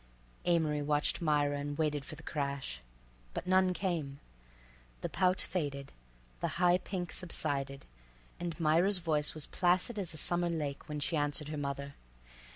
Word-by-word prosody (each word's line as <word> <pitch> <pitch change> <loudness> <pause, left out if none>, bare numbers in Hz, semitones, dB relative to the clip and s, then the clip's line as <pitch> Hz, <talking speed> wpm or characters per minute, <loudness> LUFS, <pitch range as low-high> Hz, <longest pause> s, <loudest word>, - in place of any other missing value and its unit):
Amory 160 -4 +2
watched 145 +2 +1
Myra 145 -2 +2
and 145 0 -4
waited 150 -3 0
for - - -7
the - - -13
crash—but - - -5
none 185 0 +4
came. 165 -7 -2 0.8
The - - -2
pout 185 0 +2
faded, 140 -6 -2 0.5
the - - 0
high 180 0 +5
pink 180 -3 -4
subsided, 140 -6 -2 0.5
and 170 -2 -4
Myra's 170 +5 +4
voice 155 -4 +1
was 155 -2 0
placid 185 +5 +2
as 175 -4 -2
a - - -7
summer 175 +2 +3
lake 150 -4 -3
when 150 0 -3
she 145 - 0
answered 145 0 0
her 155 - -3
mother. 140 0 -3
150 Hz, 150 wpm, -33 LUFS, 140-175 Hz, 0.8 s, high